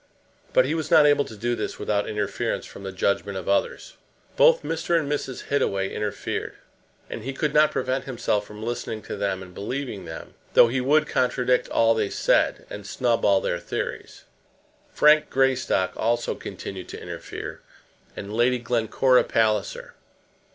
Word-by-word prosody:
But 130 Hz, -, +4 dB
he 145 Hz, -, -1 dB
was 160 Hz, -2 st, -3 dB
not -, -, +7 dB
able 145 Hz, -1 st, +4 dB
to 110 Hz, -, -10 dB
do 120 Hz, +4 st, -1 dB
this -, -, -4 dB
without 105 Hz, -1 st, -1 dB
interference 105 Hz, -1 st, -2 dB
from -, -, -11 dB
the 95 Hz, -1 st, -5 dB
judgment 100 Hz, +1 st, -1 dB
of 95 Hz, -, -6 dB
others. 100 Hz, -, -1 dB, 0.4 s
Both -, -, +5 dB
Mr. 165 Hz, +2 st, 0 dB
and 150 Hz, -, -3 dB
Mrs. 140 Hz, -3 st, -3 dB
Hittaway 100 Hz, -9 st, 0 dB
interfered; 105 Hz, -1 st, -3 dB, 0.5 s
and -, -, -6 dB
he 135 Hz, +3 st, -4 dB
could 150 Hz, +1 st, -1 dB
not 150 Hz, 0 st, +5 dB
prevent 130 Hz, +1 st, -2 dB
himself 110 Hz, -5 st, -1 dB
from 105 Hz, +1 st, -10 dB
listening 115 Hz, -2 st, -4 dB
to -, -, -6 dB
them 100 Hz, -2 st, -2 dB
and 90 Hz, -1 st, -13 dB
believing 105 Hz, -1 st, -5 dB
them, 80 Hz, 0 st, -9 dB, 0.2 s
though 120 Hz, -, +8 dB
he 130 Hz, +2 st, 0 dB
would 150 Hz, +4 st, +3 dB
contradict 125 Hz, 0 st, +1 dB
all 115 Hz, 0 st, +3 dB
they 110 Hz, -3 st, 0 dB
said, -, -, +1 dB
and 100 Hz, -1 st, -8 dB
snub 120 Hz, +1 st, 0 dB
all 100 Hz, -1 st, +4 dB
their 85 Hz, -, -1 dB
theories. -, -, -5 dB, 0.7 s
Frank 150 Hz, 0 st, +5 dB
Greystock 130 Hz, -8 st, +1 dB
also 120 Hz, +1 st, 0 dB
continued 95 Hz, -2 st, -8 dB
to -, -, -7 dB
interfere, -, -, -7 dB, 0.6 s
and 100 Hz, +1 st, -6 dB
Lady 120 Hz, +3 st, +3 dB
Glencora 120 Hz, +2 st, +2 dB
Palliser. 110 Hz, -3 st, 0 dB
115 Hz, 165 wpm, -24 LUFS, 100-135 Hz, 0.7 s, though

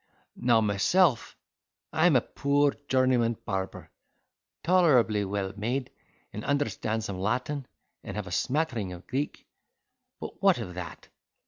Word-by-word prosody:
Now 120 Hz, -2 st, +3 dB
myself, 115 Hz, -, +2 dB, 0.6 s
I 160 Hz, +2 st, +4 dB
am 165 Hz, -, +4 dB
a 125 Hz, -, +5 dB
poor 140 Hz, +2 st, +1 dB
journeyman 125 Hz, -3 st, +2 dB
barber, 95 Hz, -1 st, -4 dB, 0.7 s
tolerably 140 Hz, -, +4 dB
well 100 Hz, 0 st, -3 dB
made 125 Hz, +5 st, -2 dB, 0.4 s
and 105 Hz, -, -5 dB
understand 140 Hz, -6 st, -1 dB
some 100 Hz, -4 st, -4 dB
Latin, 125 Hz, +7 st, -2 dB, 0.4 s
and -, -, -7 dB
have 105 Hz, -2 st, -3 dB
a 95 Hz, -, -9 dB
smattering 120 Hz, -, -1 dB
of 90 Hz, 0 st, -11 dB
Greek; 140 Hz, +3 st, -3 dB, 0.7 s
but -, -, -8 dB
what -, -, +5 dB
of 90 Hz, -, -6 dB
that? 90 Hz, -2 st, -8 dB
120 Hz, 130 wpm, -28 LUFS, 100-140 Hz, 0.7 s, a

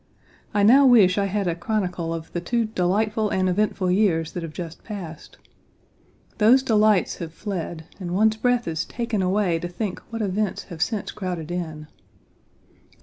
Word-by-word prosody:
I 205 Hz, -1 st, +1 dB
now 265 Hz, +6 st, +7 dB
wish 205 Hz, -6 st, +6 dB
I 200 Hz, -, +1 dB
had 200 Hz, 0 st, -1 dB
a 170 Hz, -, +1 dB
chronicle 180 Hz, -2 st, -2 dB
of 165 Hz, -1 st, -6 dB
the 175 Hz, -, -2 dB
two 235 Hz, +6 st, 0 dB
delightful 210 Hz, +2 st, 0 dB
and 185 Hz, -1 st, +1 dB
eventful 185 Hz, -1 st, +1 dB
years 175 Hz, -5 st, +2 dB
that 175 Hz, -, -5 dB
have 165 Hz, -2 st, -6 dB
just 165 Hz, 0 st, -8 dB
passed. 180 Hz, -8 st, -8 dB, 1.0 s
Those 240 Hz, +5 st, +6 dB
delights 215 Hz, -5 st, +3 dB
have 165 Hz, -2 st, -6 dB
fled 170 Hz, -4 st, -5 dB
and 180 Hz, -3 st, -5 dB
one's 215 Hz, +2 st, +3 dB
breath 245 Hz, +1 st, +1 dB
is 165 Hz, -1 st, -1 dB
taken 235 Hz, -4 st, -3 dB
away 185 Hz, -2 st, +1 dB
to 175 Hz, -, -4 dB
think 185 Hz, +2 st, -4 dB
what 225 Hz, -1 st, -3 dB
events 205 Hz, +1 st, -1 dB
have 160 Hz, -, -8 dB
since 215 Hz, +2 st, -1 dB
crowded 175 Hz, -4 st, -5 dB
in. 160 Hz, -4 st, -4 dB
190 Hz, 165 wpm, -24 LUFS, 175-215 Hz, 1.0 s, now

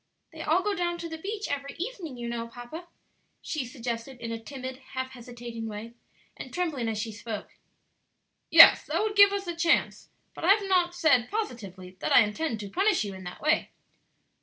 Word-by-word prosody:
"They -, -, -8 dB
all 350 Hz, +4 st, +2 dB
go 415 Hz, -, 0 dB
down 345 Hz, -2 st, -1 dB
to 340 Hz, -, -5 dB
the 320 Hz, -1 st, -7 dB
beach 415 Hz, +4 st, -4 dB
every 280 Hz, 0 st, -4 dB
evening, 345 Hz, -, -5 dB
you 240 Hz, 0 st, -5 dB
know, 235 Hz, -1 st, -3 dB
papa," 245 Hz, +9 st, -9 dB, 0.5 s
she 310 Hz, -4 st, -3 dB
suggested 240 Hz, 0 st, -5 dB
in 230 Hz, -1 st, -5 dB
a 230 Hz, -, -4 dB
timid, 260 Hz, +2 st, -7 dB, 0.2 s
half 260 Hz, 0 st, -3 dB
hesitating 240 Hz, -2 st, -8 dB
way, 220 Hz, +2 st, -7 dB, 0.4 s
and 260 Hz, -, -9 dB
trembling 300 Hz, -8 st, -2 dB
as 220 Hz, -1 st, -2 dB
she 220 Hz, +1 st, -3 dB
spoke. 220 Hz, 0 st, -6 dB, 1.0 s
"Yes, -, -, +9 dB
that -, -, 0 dB
would 430 Hz, -1 st, -2 dB
give 405 Hz, -1 st, +8 dB
us 400 Hz, -1 st, -2 dB
a 345 Hz, -1 st, -4 dB
chance; 340 Hz, 0 st, +1 dB, 0.2 s
but -, -, -10 dB
I 380 Hz, +4 st, +7 dB
have 410 Hz, -2 st, -5 dB
not 355 Hz, -2 st, +2 dB
said 305 Hz, -8 st, +3 dB
positively 195 Hz, -, -5 dB
that -, -, -2 dB
I -, -, +9 dB
intend 225 Hz, +3 st, -1 dB
to 205 Hz, -, -6 dB
punish 390 Hz, -, +2 dB
you 200 Hz, -2 st, -5 dB
in 190 Hz, -1 st, -10 dB
that 180 Hz, -, -8 dB
way." 305 Hz, +1 st, +2 dB
260 Hz, 195 wpm, -28 LUFS, 230-345 Hz, 1.0 s, Yes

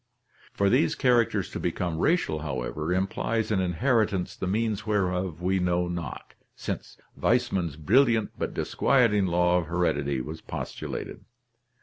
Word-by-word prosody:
For 100 Hz, -, +1 dB
these 85 Hz, -4 st, +3 dB
characters 125 Hz, -3 st, +2 dB
to -, -, -4 dB
become 85 Hz, -3 st, -2 dB
racial, 160 Hz, -, +1 dB
however, 75 Hz, +2 st, -3 dB
implies 95 Hz, +4 st, 0 dB
an 100 Hz, -, +2 dB
inheritance 100 Hz, -, +1 dB
the 90 Hz, -, -4 dB
means 105 Hz, +1 st, -1 dB
whereof 90 Hz, -4 st, -1 dB
we 95 Hz, +1 st, +2 dB
know 90 Hz, 0 st, +1 dB
not, 85 Hz, -1 st, -6 dB, 0.2 s
since -, -, -5 dB, 0.2 s
Weismann's 85 Hz, -7 st, +1 dB
brilliant 110 Hz, -, +3 dB
but -, -, -4 dB
disquieting 110 Hz, -8 st, +2 dB
law 90 Hz, 0 st, +3 dB
of 85 Hz, -, -5 dB
heredity 80 Hz, -5 st, 0 dB
was 75 Hz, +5 st, -6 dB
postulated. -, -, -6 dB
90 Hz, 130 wpm, -27 LUFS, 85-110 Hz, 0.2 s, these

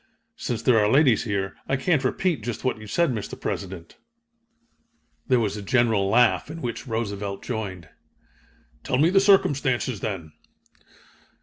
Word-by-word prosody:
"Since 115 Hz, -2 st, -4 dB
there 120 Hz, -2 st, +4 dB
are 105 Hz, 0 st, +3 dB
ladies 135 Hz, -6 st, +4 dB
here, 100 Hz, -2 st, -2 dB
I 140 Hz, -, +2 dB
can't 140 Hz, +1 st, +1 dB
repeat 160 Hz, +2 st, 0 dB
just 120 Hz, 0 st, -5 dB
what 130 Hz, -4 st, -1 dB
you 110 Hz, -, -10 dB
said, 170 Hz, +7 st, +1 dB
Mr. 110 Hz, -3 st, -6 dB
President." 90 Hz, -3 st, -5 dB, 1.3 s
There 125 Hz, -2 st, +3 dB
was 105 Hz, -3 st, -1 dB
a 105 Hz, -, -6 dB
general 110 Hz, -2 st, +2 dB
laugh 120 Hz, +5 st, +3 dB
in 165 Hz, +2 st, -7 dB
which 120 Hz, +2 st, -4 dB
Roosevelt 100 Hz, -4 st, -4 dB
joined. 95 Hz, -8 st, -5 dB, 1.0 s
"Tell 125 Hz, -, 0 dB
me 155 Hz, +6 st, +4 dB
the 195 Hz, -, +5 dB
circumstances, 140 Hz, -, +2 dB
then." 90 Hz, -8 st, -5 dB
115 Hz, 145 wpm, -24 LUFS, 100-130 Hz, 1.3 s, the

